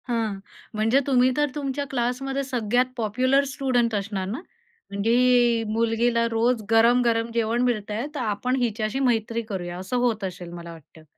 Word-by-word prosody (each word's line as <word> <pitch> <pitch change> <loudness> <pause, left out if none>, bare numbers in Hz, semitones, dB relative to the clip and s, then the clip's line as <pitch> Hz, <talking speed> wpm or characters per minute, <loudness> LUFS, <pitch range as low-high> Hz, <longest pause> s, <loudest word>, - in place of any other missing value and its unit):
हां, 225 -5 -1 0.4
म्हणजे 225 +5 +3
तुम्ही 255 -2 +4
तर 295 0 +2
तुमच्या 280 -1 -3
क्लासमध्ये 270 +2 -2
सगळ्यात 245 -2 +1
पॉप्युलर 255 +5 +2
स्टुडंट 245 -5 +1
असणार 200 -2 -3
ना, 225 +8 -4 0.5
म्हणजे 235 +2 +3
मुलगीला 230 +1 +1
रोज 230 +1 +1
गरम-गरम 230 0 +3
जेवण 230 +1 0
मिळतंय, 220 -1 -1
तर - - -3
आपण 225 +3 -1
हिच्याशी 225 +1 -1
मैत्री 230 -3 0
करूया 185 -5 -5
असं 190 +7 -3
होत 235 -4 0
असेल 180 -2 -6
मला 170 -1 -8
वाटतं. 160 0 -15
230 Hz, 145 wpm, -24 LUFS, 215-250 Hz, 0.5 s, तुम्ही